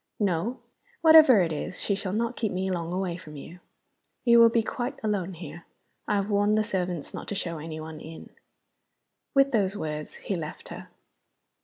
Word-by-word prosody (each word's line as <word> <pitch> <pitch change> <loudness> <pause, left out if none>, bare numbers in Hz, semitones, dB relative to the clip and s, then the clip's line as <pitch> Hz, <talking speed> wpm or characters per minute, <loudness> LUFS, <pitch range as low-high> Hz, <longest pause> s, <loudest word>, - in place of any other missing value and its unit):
"No. 205 +5 0 0.4
Whatever 315 - +8
it 165 -2 -2
is, 155 +4 -5
she 200 - 0
shall 195 -1 -3
not 230 +3 -1
keep 220 -3 -2
me 190 +1 -2
long 170 -2 -3
away 180 -2 -2
from 155 -4 -12
you. 165 +5 -10 0.7
You 235 -1 +7
will 230 0 +8
be 230 0 +1
quite 250 +4 -4
alone 195 -4 -1
here; 170 0 -10 0.4
I 210 - +1
have 200 +1 -1
warned 205 +1 +3
the 215 - +3
servants 180 -7 -3
not - - -7
to 205 - -4
show 170 -4 -3
any 155 0 -6
one 155 0 -8
in." 160 +1 -11 1.0
With 275 0 +5
those 205 -4 +1
words 150 -3 -5
he 195 - -4
left 155 -3 -7
her. - - -9
190 Hz, 185 wpm, -27 LUFS, 170-220 Hz, 1.0 s, Whatever